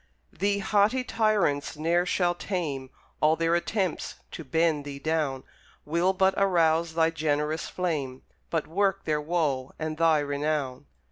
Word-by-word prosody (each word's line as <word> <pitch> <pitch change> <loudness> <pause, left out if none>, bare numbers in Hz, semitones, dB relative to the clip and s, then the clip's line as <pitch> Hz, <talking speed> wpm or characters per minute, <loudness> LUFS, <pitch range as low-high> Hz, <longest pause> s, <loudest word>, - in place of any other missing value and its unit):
Thee 200 +3 0
haughty 210 +5 +2
tyrants 205 -12 +1
ne'er 170 +3 +1
shall 175 -1 +2
tame; 155 -8 -3 0.3
All 155 +1 +5
their 165 0 +1
attempts 185 +1 -1 0.2
to 165 - -7
bend 160 +1 +1
thee 140 -1 -7
down 145 -3 -1 0.4
Will 170 +5 +2
but 190 0 +3
arouse 170 -4 +2
thy 165 0 +3
generous 155 0 -1
flame, 145 -8 -3 0.3
But 165 -2 -1
work 195 +3 0
their 150 -1 0
woe 150 -5 -1
and 155 -1 -4
thy 165 -1 +4
renown. 145 -2 -2
160 Hz, 140 wpm, -27 LUFS, 150-180 Hz, 0.4 s, All